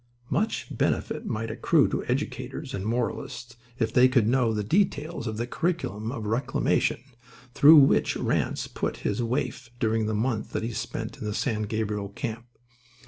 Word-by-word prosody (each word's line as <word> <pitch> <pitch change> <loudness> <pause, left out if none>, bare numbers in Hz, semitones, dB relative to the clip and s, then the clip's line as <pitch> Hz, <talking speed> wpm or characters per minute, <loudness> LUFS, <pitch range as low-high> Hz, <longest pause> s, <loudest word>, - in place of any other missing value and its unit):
Much 220 +2 -1
benefit - - -1
might 110 +1 -2
accrue - - +3
to - - -2
educators - - -3
and 95 +1 -3
moralists 120 +1 -3 0.2
if 115 -3 -1
they 125 +1 +7
could 125 -4 +3
know 125 -1 +3
the 105 -1 -1
details 155 - 0
of 110 -1 -3
the 120 - -1
curriculum 120 - -2
of 115 -5 -5
reclamation 115 +1 0 0.5
through 150 +5 +8
which 140 -2 +5
Ranse - - 0
put - - -3
his 105 +4 0
waif 125 +1 -2
during 110 -1 +1
the 110 - -1
month 110 0 -1
that - - -1
he 115 - -2
spent - - -4
in - - -5
the 105 -1 -2
San 110 -5 -1
Gabriel 105 -2 -2
camp. 115 +3 -5
115 Hz, 165 wpm, -27 LUFS, 110-130 Hz, 0.5 s, through